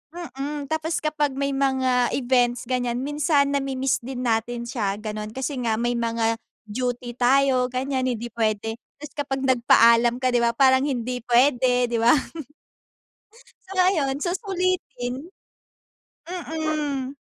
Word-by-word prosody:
mm, 290 -3 -6
tapos 315 0 -1
kapag 300 -3 0
may 280 0 -1
mga 260 -2 +1
events 245 -2 +1
ganiyan, 245 0 -2
minsan 290 -1 +1
nami-miss 270 -1 0
din 255 +1 -6
natin 235 +1 -1
siya, 210 -5 -2
gano'n. 215 +1 -6
Kasi 265 0 -3
nga 230 -2 0
may 240 +1 -1
mga 230 -1 0 0.2
duty 245 +2 -3
tayo 255 +1 +3
ganiyan, 260 +1 -2
hindi 240 -1 -3
puwede. 225 0 -1 0.2
Tapos 290 0 -11
kapag 270 -1 -2
nagpaalam 235 -2 +5
ka, 255 0 0
di 240 - +2
ba, 235 0 +1
parang 265 +1 +4
hindi 250 -2 -2
puwede, 250 -1 +3
di 230 - 0
ba? 235 +6 +5 1.5
So, 385 - -7
ayon, 315 -8 +2
susulitin. 350 - -2 1.0
Mm. 310 -6 -3
255 Hz, 130 wpm, -24 LUFS, 240-280 Hz, 1.5 s, nagpaalam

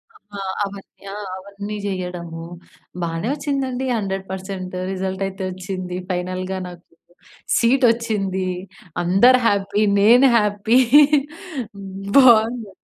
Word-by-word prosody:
అ! - - -16 0.2
ఆ! - - -5 0.3
అవన్నీ 200 0 -11
ఆ! - - -6 0.2
అవన్నీ 200 +2 -7
జేయడము. 180 -4 -5 0.6
బానే 165 +3 -2
వొచ్చిందండి. 275 -3 -2
100% 190 -2 -5 0.2
రిజల్ట్ 190 0 -3
అయితే 190 0 -7
వొచ్చింది. 185 -1 -5
ఫైనల్‌గా 185 +1 -3
నాకు 175 -1 -11 0.7
సీటొచ్చింది. 230 -6 +1 0.6
అందరు 200 +9 +5
హ్యాపీ. 200 0 +1 0.2
నేను 240 +6 +6
హ్యాపీ. 210 +2 +2 1.4
బావుంది. 230 -4 +5
195 Hz, 95 wpm, -21 LUFS, 185-230 Hz, 1.4 s, నేను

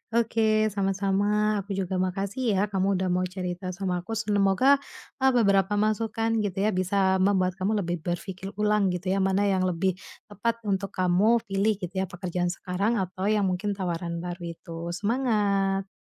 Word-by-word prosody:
Oke, 220 -2 +2
sama-sama. 200 +2 +1
Aku 200 0 -5
juga 190 -1 -2
makasih 200 +5 -1
ya, 190 - +1
kamu 195 0 +1
udah 185 -1 0
mau 185 +1 +1
cerita 180 0 -5
sama 185 -2 -2
aku. 210 +6 -5
Semoga, 210 +5 +3 0.4
e 265 - -5
beberapa 200 -3 +3
masukan, 220 +2 0
gitu 205 -3 -2
ya, 215 - +2
bisa 190 0 +1
membuat 185 -1 +2
kamu 205 +4 +1
lebih 175 0 -2
berpikir 185 +3 -5
ulang, 210 -1 +2
gitu 180 +1 -2
ya, 195 - +1
mana 195 +1 +2
yang 190 -2 +2
lebih 185 +1 0 0.3
tepat 230 +3 -2
untuk 195 -1 -2
kamu 190 +6 +3
pilih, 205 0 +1
gitu 185 -3 -7
ya, 190 - -1
pekerjaan 180 -1 -3
sekarang 185 +5 -1
atau 190 -1 -2
yang 210 -1 +2
mungkin 200 +3 -2
tawaran 170 -2 -3
baru 175 0 -6
itu. 165 +1 -8
Semangat! 200 -3 +1
195 Hz, 165 wpm, -26 LUFS, 185-210 Hz, 0.4 s, Semoga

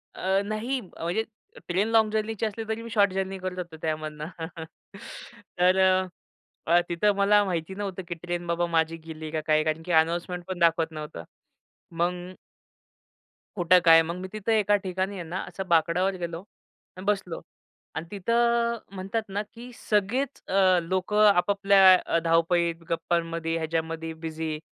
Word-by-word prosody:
अ, 190 +1 +1
नाही 220 +6 -2 0.2
अ, - - -7
म्हणजे 180 +7 0 0.4
train 190 +4 +1
long 225 -1 +3
जर्नीची 220 0 -1
असली, 220 +1 -4
तरी 220 +1 -2
मी 230 - -8
शॉर्ट 205 -3 +3
जर्नी 190 0 -2
करत 185 0 -5
असतो 175 -3 -7
त्यामधुन. 155 -1 -3 1.4
तर 180 +1 +4
अ, 185 0 +4 0.6
अ, 170 +1 +5
तिथे 175 +5 +2
मला 205 +1 +4
माहिती 180 0 -3
नव्हतं, 195 -2 -5
की 175 - -3
ट्रेन 175 +1 -5
बाबा 170 +1 0
माझी 165 0 +1
गेली 155 -1 -7
का 155 -1 -2
काय? 155 0 +3
कारण 155 +1 -1
की 180 - -4
अनाउन्समेंटपण 175 +2 0
दाखवत 165 -1 +3
नव्हतं. 150 - -7 0.7
मग 175 +2 -2 1.2
कुठं 180 -1 +5
काय 165 0 +8
मग 170 +1 -4
मी 190 - -5
तिथे 215 +1 +1
एका 205 0 +3
ठिकाणी 190 +1 -2
आहे 180 - -5
ना 180 +3 -3
असं 190 -1 -6
बाकड्यावर 170 +3 +2
गेलो 170 -2 -4 0.6
आणि 185 - -8
बसलो 195 -4 -1 0.5
आणि 160 - -4
तिथं 235 +3 +1
अ, - - -9 0.2
म्हणतात 195 +4 -2
ना, 200 +1 -2
की 240 +2 -10
सगळेच 220 +7 -1
अ, 185 -2 +4
लोकं 190 +5 +1
आपापल्या 200 0 +5
अ, 165 - +1
धावपळीत 165 0 +1
गप्पांमध्ये 165 -1 -1
ह्याच्यामध्ये 160 0 -3
बिझी. 160 -1 -5
180 Hz, 155 wpm, -26 LUFS, 165-200 Hz, 1.4 s, काय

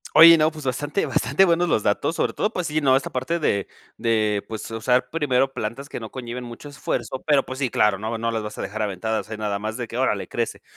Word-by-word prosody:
Oye, 165 0 +10
no, 155 0 +4
pues 155 -2 -10
bastante 145 +8 -1
bastante 195 - +2
buenos 175 0 +2
los 110 - +2
datos, 145 +10 0
sobre - - 0
todo, 210 - 0
pues 180 -5 -3
sí, 155 -1 0
¿no?, 135 -2 +4
esta 135 - -1
parte 130 +7 -1
de 100 -11 0 0.3
de 110 -3 +1
pues 110 -1 -6
usar 125 +3 +1
primero 135 -4 +1
plantas 120 +6 -4
que - - -6
no 110 -2 -7
conlleven 125 -1 -6
mucho 120 +4 -9
esfuerzo, 140 -2 -4
pero 145 -3 +4
pues 130 0 -6
sí, 135 -3 0
claro, 105 -3 +2
no 110 +2 -3
no 115 +1 -1
las 115 -1 -1
vas 105 0 -7
a - - -4
dejar 110 +2 -4
a 105 - +1
ventadas. 105 +1 -3
Hay 110 - -5
nada 105 -2 -2
más 110 +2 -4
de 120 -2 -4
que 115 - -6
órale 115 -6 0
crece. 120 -1 -3
125 Hz, 250 wpm, -23 LUFS, 110-145 Hz, 0.3 s, Oye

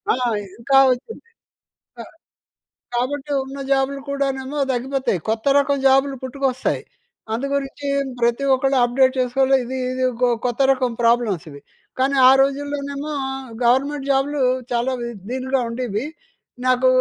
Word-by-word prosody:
ఆహ్, 245 -3 0 0.2
ఇంకా 270 +3 +4
వచ్చింది. 270 - -10 0.8
అహ్, - - -11 0.8
కాబట్టి 270 +4 -2
ఉన్న 270 +1 -8
జాబులు 275 0 +1
కూడానేమో 275 0 -2
తగ్గిపోతాయి. 260 - -1
కొత్త 220 0 -1
రకం 280 0 +1
జాబులు 270 0 +3
పుట్టుకొస్తాయి. 260 0 -2 0.5
అందు 245 +5 -2
గురించి 280 +1 -4 0.3
ప్రతి 235 +3 +1
ఒక్కళ్ళు 270 +1 +1
అప్డేట్ 260 +2 +3
చేసుకోవాలి. 265 +2 +2
ఇది 260 +2 -5 0.2
ఇది 255 - -4
ఇకో 245 +1 +1 0.2
కొత్త 245 +2 0
రకం 255 -2 0
ప్రాబ్లమ్స్ 230 -7 +2
ఇవి. 140 0 -12 0.4
కానీ, 270 +2 +2
ఆ - - +8
రోజుల్లోనేమో 280 +1 -2 0.5
గవర్నమెంట్ 275 +3 +1
జాబులు 275 +1 0 0.3
చాలా 245 +2 0
వి 235 - -3 0.2
దీనిగా 260 +1 -1
ఉండేవి. 230 0 -3 0.6
నాకు 255 0 +3
265 Hz, 125 wpm, -21 LUFS, 245-275 Hz, 0.8 s, ఆ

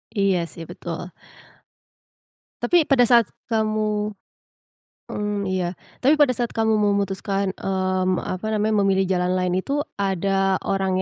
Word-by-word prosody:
Iya 195 -3 +2
sih, 165 - -8
betul. 175 +1 -6 1.5
Tapi 345 -4 +3
pada 270 -3 +3
saat 235 -2 +6 0.2
kamu 215 -1 0 1.0
mmm, 205 -2 -2
iya. 180 -2 -1 0.3
Tapi 285 - +7
pada 285 - +6
saat 240 -1 -2
kamu 220 -1 +2
memutuskan, 200 -1 0
mmm, 185 -1 0
apa 185 +3 -5
namanya, 210 -1 +2
memilih 190 -1 +2
jalan 180 -1 +1
lain 180 -1 0
itu 280 +10 -1 0.2
ada 195 0 +1
orang 190 -1 0
195 Hz, 125 wpm, -23 LUFS, 185-215 Hz, 1.5 s, Tapi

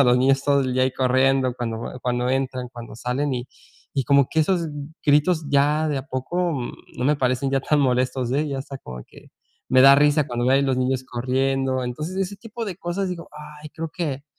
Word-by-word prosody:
a - - +7
los 125 0 +4
niños 135 +1 +3
todo 140 -1 +3
el 130 - -2
día 130 - +2
ahí 130 - 0
corriendo 130 0 +2
cuando 115 -2 -3
va 125 - -6
cuando 125 0 -1
entran, 130 -1 -2
cuando 120 -3 -9
salen, 130 +3 -1
y 125 +1 -5 0.5
y 135 -2 0
como 140 0 +4
que 160 - +2
esos 170 0 +1 0.4
gritos 150 +2 +3
ya 150 +2 +3
de 145 -2 -1
a 135 - -8
poco, 130 +8 -3 0.6
no 125 - -2
me 150 +2 +3
parecen 130 0 0
ya 135 0 +1
tan 150 +2 +1
molestos, 125 -1 +1
eh, 150 +3 +1
ya 140 -1 -3
hasta 135 0 -7
como 60 -1 -9
que - - -17 0.4
me 130 - +5
da 140 +1 +9
risa 145 0 +3
cuando 120 0 -1
veo 135 +1 +5
a 140 - +2
los 135 -2 +1
niños 130 0 0
corriendo. 130 +1 -1
Entonces 150 +9 -5
ese 195 +1 -2
tipo 225 +3 -7
de 195 -5 -5
cosas 185 +2 -3
digo, 175 -2 -6 0.3
ay 150 - -9
creo 160 0 -6
que 145 -5 -3
135 Hz, 220 wpm, -23 LUFS, 130-150 Hz, 0.6 s, da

